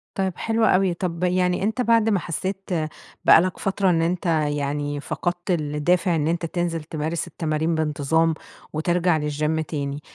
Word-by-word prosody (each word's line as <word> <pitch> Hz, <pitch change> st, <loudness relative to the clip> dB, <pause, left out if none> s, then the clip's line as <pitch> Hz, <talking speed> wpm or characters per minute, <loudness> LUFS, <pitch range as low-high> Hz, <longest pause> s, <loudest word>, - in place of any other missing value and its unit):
طيب 190 Hz, -2 st, 0 dB
حلو 225 Hz, 0 st, +1 dB
أوي، 185 Hz, -2 st, +3 dB
طب 175 Hz, -1 st, -3 dB
يعني 180 Hz, +1 st, +1 dB
أنت 220 Hz, +4 st, 0 dB
بعد 230 Hz, -2 st, +3 dB
ما 200 Hz, -4 st, +2 dB
حسيت 190 Hz, +4 st, -4 dB, 0.6 s
بقى -, -, +8 dB
لك 185 Hz, 0 st, -2 dB
فترة 195 Hz, -1 st, +1 dB
إن 165 Hz, -2 st, +2 dB
أنت 175 Hz, +2 st, -1 dB
يعني 145 Hz, -2 st, 0 dB
فقَدت 175 Hz, +4 st, -3 dB
الدافع 165 Hz, +3 st, +1 dB
إن 150 Hz, 0 st, 0 dB
أنت 170 Hz, 0 st, 0 dB
تنزل 165 Hz, -1 st, -2 dB
تمارس 160 Hz, +2 st, -3 dB
التمارين 160 Hz, 0 st, -1 dB
بانتظام 160 Hz, +1 st, +1 dB, 0.4 s
وترجع 175 Hz, +1 st, +1 dB
للجيم 150 Hz, +1 st, -1 dB
تاني، 145 Hz, -2 st, -4 dB
170 Hz, 155 wpm, -23 LUFS, 155-185 Hz, 0.6 s, بقى